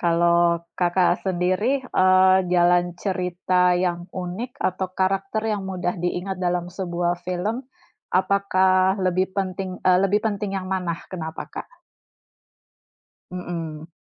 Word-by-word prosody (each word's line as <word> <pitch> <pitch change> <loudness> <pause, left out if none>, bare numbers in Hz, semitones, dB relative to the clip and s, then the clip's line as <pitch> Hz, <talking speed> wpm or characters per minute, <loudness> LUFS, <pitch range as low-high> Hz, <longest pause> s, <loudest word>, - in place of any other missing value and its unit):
Kalau 170 0 +3 0.4
Kakak 180 0 +3
sendiri, 185 +2 0 0.4
eee, 185 0 +6 0.2
jalan 175 0 +4 0.2
cerita 180 -1 +1
yang 175 -1 0
unik 185 +7 -5 0.2
atau 185 +1 -3
karakter 195 +3 0
yang 200 - -4
mudah 180 -1 -2
diingat 180 +2 -2
dalam 175 0 0
sebuah 175 -1 -2
film, 185 +5 -2 0.6
apakah 190 0 +3
lebih 185 +1 +2
pentin 190 -1 -2 0.2
eee, 180 -1 +6
lebih 200 +2 +3
penting 205 -1 -2
yang 185 - -7
mana, 180 -3 -1 0.2
kenapa, 160 -3 -5
Kak? - - -9 1.5
Mhm. 165 -3 -6
185 Hz, 115 wpm, -23 LUFS, 175-190 Hz, 1.5 s, eee